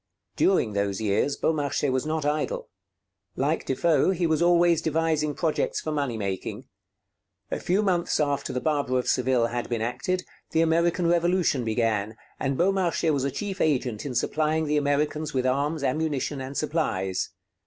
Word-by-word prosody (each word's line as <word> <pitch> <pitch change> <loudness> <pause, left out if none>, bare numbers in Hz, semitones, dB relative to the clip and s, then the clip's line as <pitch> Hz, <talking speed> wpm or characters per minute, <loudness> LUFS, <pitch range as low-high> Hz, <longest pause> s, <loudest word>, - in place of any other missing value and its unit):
During 155 - +2
those 100 -1 -1
years 110 +6 +1
Beaumarchais 145 -3 0
was 130 +3 -1
not 155 -1 -1
idle. 475 - -1 0.7
Like - - -1
Defoe, 165 -1 +2
he 180 -2 +1
was 160 0 +1
always 170 -1 +4
devising 155 -2 0
projects 160 -2 0
for 155 - -4
money 140 -6 -1
making. 100 -3 -4 0.9
A - - -1
few 190 +4 +1
months 180 -5 +1
after 145 -2 0
'The 125 - -2
Barber 145 -4 0
of 125 - -1
Seville' 125 -2 +2
had 120 -1 -3
been 115 -2 -1
acted, 140 +10 -2 0.3
the 160 - +4
American 170 +2 +2
Revolution 170 -5 +2
began, 110 -2 0 0.2
and 135 0 -1
Beaumarchais 175 -3 +2
was 140 -3 0
a - - +1
chief 195 +6 -4
agent 125 -8 0
in 135 -3 -5
supplying 155 +4 +1
the 150 0 +1
Americans 145 +1 0
with 130 -1 +1
arms, 140 +4 0
ammunition, 145 0 -1
and 130 +2 -6
supplies. 95 - -1
150 Hz, 160 wpm, -26 LUFS, 130-165 Hz, 0.9 s, always